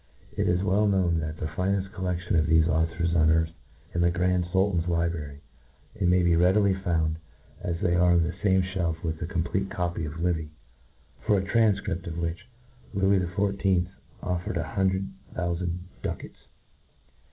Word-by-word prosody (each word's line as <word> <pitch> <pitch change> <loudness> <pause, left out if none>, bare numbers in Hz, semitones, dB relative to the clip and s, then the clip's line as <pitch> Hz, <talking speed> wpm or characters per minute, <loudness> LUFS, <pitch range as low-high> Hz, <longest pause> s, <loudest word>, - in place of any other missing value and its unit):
It - - 0
is 90 +2 +1
well 100 +2 +2
known 90 -4 +2
that 80 0 -4
the - - -4
fineft 95 +4 -1
collec 90 -2 -2
tion 90 - -1
of 80 -1 +3
thefe' 80 0 +4
authors 80 +1 0
on 80 -1 +4
earth 80 0 +3
ftands 80 - -28
in 85 - 0
the 85 - +4
Grand 90 0 +1
Sultan's 95 -2 +1
library 85 -4 -2 0.5
J - - -18
and 90 -3 +2
may 90 0 +4
be 85 -1 +4
readily 95 +3 +4
founcj, 85 -4 0 0.4
as 85 - -2
iliey 85 +1 +1
arq 90 0 +5
on 85 - +4
the 85 +2 -2
fame 95 0 +2
iOielf 90 -4 -2
with 80 -1 -2
the 85 - -3
complete 90 +2 -1
copy 90 -4 -2
of 75 - -5
Livy^ 80 -2 -1 0.7
for 105 - +2
a 95 - 0
tranfcript 100 -5 +1
of 85 -1 -5
which 85 0 -3 0.5
Lewis 95 0 +3
XIV. 95 -1 +1 0.3
offered 90 -1 -2
an - - -1
hundred 95 -1 +1 0.3
thoufand 85 0 -1 0.2
ducats. - - -6
90 Hz, 175 wpm, -27 LUFS, 85-95 Hz, 0.7 s, arq